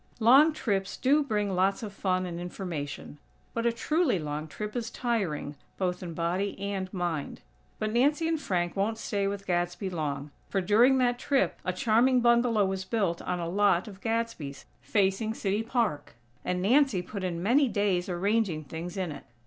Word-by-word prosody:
Long 265 +8 +7
trips 200 -9 -2
do 285 +4 +3
bring 210 -7 -1
lots 190 +5 +1
of 205 -2 -6
fun 185 -2 0
and 170 -1 -5
information; 165 -5 -6 0.3
but 230 0 0
a - - +3
truly 310 - +1
long 150 -1 -4
trip 210 +7 -6
is 235 -2 -2
tiring, 200 - -2 0.2
both 180 -2 -1
in 170 -3 -6
body 180 +4 -1
and 195 -2 -3
mind. 175 -6 -3 0.4
But 215 0 -2
Nancy 295 +7 +3
and 325 -2 0
Frank 175 -6 -1
won't 210 +3 0
stay 200 -3 -1
with 200 0 -4
Gadsby 175 +1 -1
long; 145 -3 -3 0.2
for, 195 - 0
during 225 +8 +5
that 245 -1 +2
trip, 275 0 +1
a 185 - 0
charming 235 +7 +3
bungalow 235 -3 +4
was 190 0 -2
built 190 -4 -1
on 180 - -2
a 170 - -3
lot 195 0 +2
of 200 -2 -11
Gadsby's, 225 - -3 0.2
facing 205 +2 +1
City 200 +1 0
Park; 225 - -1 0.3
and 180 0 -1
Nancy 245 -4 +3
put 195 +1 -6
in 175 -2 -2
many 265 +7 +4
days 200 -5 0
arranging 185 -2 0
things 165 +6 -7
in 185 -4 -2
it. 140 - -9
195 Hz, 175 wpm, -28 LUFS, 175-230 Hz, 0.4 s, Long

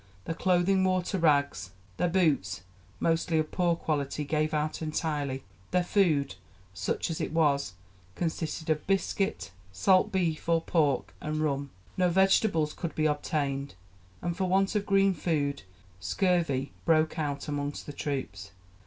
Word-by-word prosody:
Their - - -2
clothing 185 +2 +2
wore 185 -1 +2
to 190 +1 -2
rags, 145 -3 +2 0.3
their 180 - +2
boots 140 - +1 0.4
mostly 165 0 +1
of 155 -1 0
poor 175 -2 +2
quality 150 -3 -2
gave 155 +1 0
out 155 +1 -1
entirely. 150 -4 -2 0.3
Their 180 0 +2
food 165 -8 +2 0.4
such 100 - -2
as 160 - -3
it - - -2
was 140 - +2 0.4
consisted 160 -1 -2
of 155 -1 -1
biscuit, 195 - 0 0.2
salt 190 - +3
beef 170 -5 -1
or 165 0 +4
pork, 150 -6 +1
and 155 0 -2
rum. 140 -2 -1 0.3
No 180 -1 +3
vegetables 190 -3 +3
could 170 -3 -5
be 155 - +1
obtained, 140 -3 -1 0.5
and 175 -1 -1
for 190 +1 -1
want 195 +1 +2
of 210 -1 -1
green 195 -1 +4
food 145 -4 -1 0.4
scurvy 140 - 0
broke 160 -1 +2
out 145 -2 -2
among 145 -1 -2
the 145 - -7
troops. 105 -11 -4
155 Hz, 145 wpm, -29 LUFS, 145-180 Hz, 0.5 s, or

